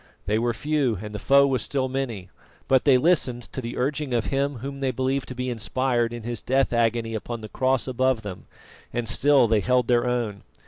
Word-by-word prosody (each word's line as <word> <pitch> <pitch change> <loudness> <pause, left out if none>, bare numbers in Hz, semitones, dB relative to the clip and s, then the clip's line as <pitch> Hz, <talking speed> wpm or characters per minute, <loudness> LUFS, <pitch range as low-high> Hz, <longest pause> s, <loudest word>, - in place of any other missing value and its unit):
They 105 +2 +1
were 120 +1 +1
few 145 -4 0
and 105 +1 -7
the 105 - -4
foe 140 +4 +5
was 130 -4 0
still 130 +3 -1
many, 125 -8 -4 0.4
but 130 -1 +3
they 135 -3 +6
listened 130 -5 +1
to 130 - -4
the 120 -1 -6
urging 140 0 -1
of 115 - 0
him 140 +1 0
whom 135 +3 -6
they 135 -1 0
believed 130 +2 -1
to 130 - -7
be 125 +1 -3
inspired 120 +2 0
in 120 -1 -7
his 120 0 -4
death 135 0 +1
agony 115 -1 +1
upon 115 +1 -5
the 110 - -8
cross 130 -1 0
above 130 -2 +1
them, 95 -3 -8 0.4
and 120 -1 -3
still 135 +1 +4
they 110 -1 +3
held 125 +2 +1
their 120 0 +2
own. 115 -5 -2
125 Hz, 215 wpm, -25 LUFS, 115-135 Hz, 0.4 s, they